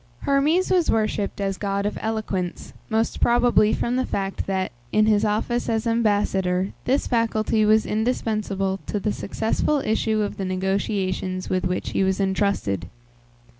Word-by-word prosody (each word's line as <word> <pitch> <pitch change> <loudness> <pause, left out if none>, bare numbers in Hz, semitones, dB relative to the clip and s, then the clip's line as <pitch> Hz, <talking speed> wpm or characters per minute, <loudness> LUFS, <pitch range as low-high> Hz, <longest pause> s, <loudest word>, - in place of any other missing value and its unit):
Hermes 295 +7 +2
was 360 -3 +3
worshipped 215 -2 0
as 195 -1 -2
god 200 -1 -1
of 205 - -1
eloquence, 210 -5 -3 0.2
most 225 +1 0
probably 240 -3 +4
from 240 +3 0
the 260 - +1
fact 195 -1 -3
that, 190 -1 -1 0.2
in 215 - +4
his 215 -1 +3
office 220 +3 0
as 225 0 0
ambassador, 205 -5 +1
this 265 +3 +1
faculty 225 -2 +1
was 215 +1 +4
indispensable 215 -4 -1
to 205 - -1
the 210 +1 -1
successful 225 +8 -1
issue 220 0 +1
of 205 - -3
the 195 - -3
negotiations 185 0 -2
with 185 -1 0
which 180 - -3
he - - +1
was 190 0 +1
intrusted. 190 - 0
210 Hz, 150 wpm, -23 LUFS, 195-225 Hz, 0.2 s, probably